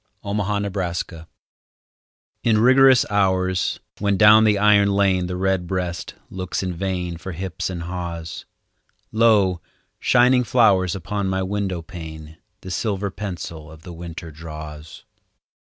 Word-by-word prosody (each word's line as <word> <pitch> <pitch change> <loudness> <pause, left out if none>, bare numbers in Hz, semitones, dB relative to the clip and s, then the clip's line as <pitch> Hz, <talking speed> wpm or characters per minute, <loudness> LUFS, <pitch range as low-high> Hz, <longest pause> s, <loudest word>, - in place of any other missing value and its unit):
XVII—WINTER 100 -5 -2 1.2
In 110 -2 +3
rigorous 130 +2 +6
hours, 95 -2 +1 0.2
when 100 -1 +1
down 110 +1 +7
the 105 -1 +3
iron 100 -1 +4
lane 95 -3 +2
The 90 - -4
redbreast 90 -2 -2 0.2
looks 95 0 -3
in 90 -1 -2
vain 90 -1 -3
For 90 +2 -7
hips 90 0 -4
and 85 -2 -5
haws, 85 -2 -6 0.7
Lo, 105 -6 +3 0.4
shining 125 +1 +4
flowers 100 -7 +3
upon 100 +2 -3
my 95 0 -1
window 95 -3 -2
pane 80 -4 -9 0.2
The 95 - -8
silver 100 0 -2
pencil 85 -6 -7
of 80 0 -14
the 90 - -9
winter 85 -1 -8
draws. 75 -1 -10
95 Hz, 120 wpm, -22 LUFS, 85-100 Hz, 1.2 s, down